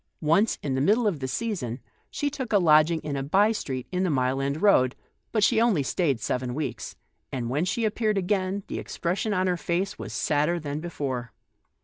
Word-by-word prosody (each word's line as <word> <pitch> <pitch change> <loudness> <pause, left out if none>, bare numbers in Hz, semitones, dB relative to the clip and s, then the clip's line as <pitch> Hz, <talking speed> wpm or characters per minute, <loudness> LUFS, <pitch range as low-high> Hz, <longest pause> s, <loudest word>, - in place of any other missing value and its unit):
Once, 170 +8 +3
in 140 - -1
the 130 - 0
middle 215 - +3
of 190 -8 0
the 130 - -3
season, 140 - -3 0.3
she 290 - -2
took 265 -4 -5
a 210 - +5
lodging 160 -2 +5
in 150 -2 -4
a 135 - -1
by 195 +10 +3
street 130 - -4
in 180 0 -1
the 185 - +1
Mile 130 -2 +1
End 140 +2 -1
Road, 130 -11 +4 0.4
but 215 -2 +1
she 225 +2 +4
only 215 -11 +3
stayed 140 -3 0
seven 125 +2 -2
weeks, 155 0 -4 0.4
and 120 -2 -3
when 150 +6 +1
she 220 +4 0
appeared 215 -1 0
again, 195 +1 0
the - - -5
expression 185 +5 -2
on 185 -2 +1
her 180 -1 +1
face 180 +4 -2
wa* - - -5
T - - -7
sadder 155 +3 +1
than 145 -1 -4
before. 135 -7 -4
170 Hz, 210 wpm, -26 LUFS, 140-200 Hz, 0.4 s, a